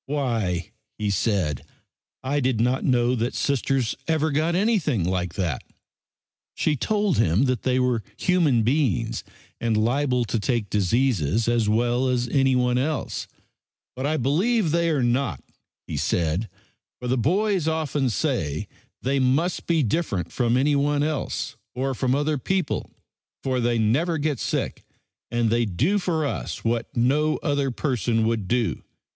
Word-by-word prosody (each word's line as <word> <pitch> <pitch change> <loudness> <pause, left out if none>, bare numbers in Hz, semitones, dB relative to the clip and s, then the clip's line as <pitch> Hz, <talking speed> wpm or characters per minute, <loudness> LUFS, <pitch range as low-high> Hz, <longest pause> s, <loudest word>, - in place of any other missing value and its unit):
"Why," 115 - -1 0.3
he 105 -1 -1
said, 95 - 0 0.6
"I 140 +3 0
did 130 -4 +1
not 125 +3 +1
know 125 -1 +2
that 120 0 -1
Sisters 135 -3 0
ever 160 -1 +1
got 155 +4 +1
anything 180 - +1
like 90 -1 -1
that." 85 -9 -2 0.9
She 155 - +1
told 205 - 0
him 95 +2 +3
that 125 -4 0
they 130 0 +1
were 125 -3 +1 0.2
human 160 -11 +2
beings 130 - 0 0.4
and 115 -2 +1
liable 125 +2 +1
to 115 - -1
take 115 -2 -1
diseases 105 - +1
as 115 -3 +2
well 120 +4 +2
as 125 -1 0
anyone 125 -2 +2
else. 145 0 -2 0.7
"But 130 +2 -2
I 155 +1 +1
believe 175 - +1
they 170 +1 +2
are 145 -5 +1
not," 120 - 0 0.4
he - - -4
said, 85 +6 0 0.5
"for 125 - -5
the 125 - +2
boys 185 - +1
often 150 -4 0
say 110 - -1 0.4
they 135 +2 +1
must 135 +8 +1
be 165 -3 +2
different 105 - -1
from 120 -1 +1
anyone 145 +1 +2
else, 150 -4 -2 0.2
or 135 +1 -1
from 130 +1 0
other 145 0 0
people, 185 +2 -1 0.5
for 130 -1 0
they 120 0 +1
never 140 +11 +1
get 145 -4 -1
sick - - -2 0.5
and 120 -1 +1
they 120 +1 +3
do 140 - +1
for 165 -5 0
us 140 - -4
what 115 0 -2
no 145 +6 +2
other 145 -3 +1
person 120 -4 0
would 110 -4 -1
do. 120 0 0
130 Hz, 150 wpm, -24 LUFS, 115-150 Hz, 0.9 s, him